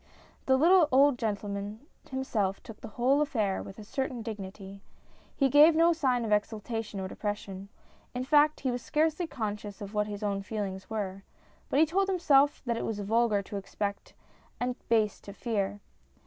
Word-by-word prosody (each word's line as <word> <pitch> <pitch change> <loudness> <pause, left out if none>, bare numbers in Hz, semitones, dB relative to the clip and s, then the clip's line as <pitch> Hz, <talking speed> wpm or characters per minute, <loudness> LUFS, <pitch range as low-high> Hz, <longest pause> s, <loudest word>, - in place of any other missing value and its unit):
The 265 -1 +5
little 335 +2 +5
old 275 0 +5
gentleman 205 -1 -3 0.3
himself 220 -7 -1
took 225 - -11
the - - -7
whole 265 +4 +3
affair 220 -10 0
with 195 - -10
a 215 - -9
certain 260 0 -3
dignity. 195 -2 -8 0.5
He 275 - +3
gave 295 +4 +7
no 335 +1 +5
sign 255 -7 +1
of 215 - -3
ex 210 0 +2
ultation 220 -1 -5
or 190 - -3
depression. 200 -1 -5 0.5
In 250 - -1
fact, 300 +2 +4
he 260 - 0
was 245 0 -3
scarcely 315 +5 0
con 220 -8 -3
scious 205 0 -9
what 210 0 0
his 205 0 -6
own 200 -1 -1
feelings 195 -2 -5
were, 195 -3 -3 0.5
but 275 - +2
he 320 - +7
told 385 +5 +1
himself 295 -6 +3
that 235 -2 0
it - - -3
was 220 -2 -3
vulgar 215 0 +2
to 200 - -6
expect 200 +1 -5 0.4
and 245 0 -1
base 220 -3 +2
to 200 - -10
fear. 205 -2 -2
225 Hz, 175 wpm, -29 LUFS, 205-270 Hz, 0.5 s, gave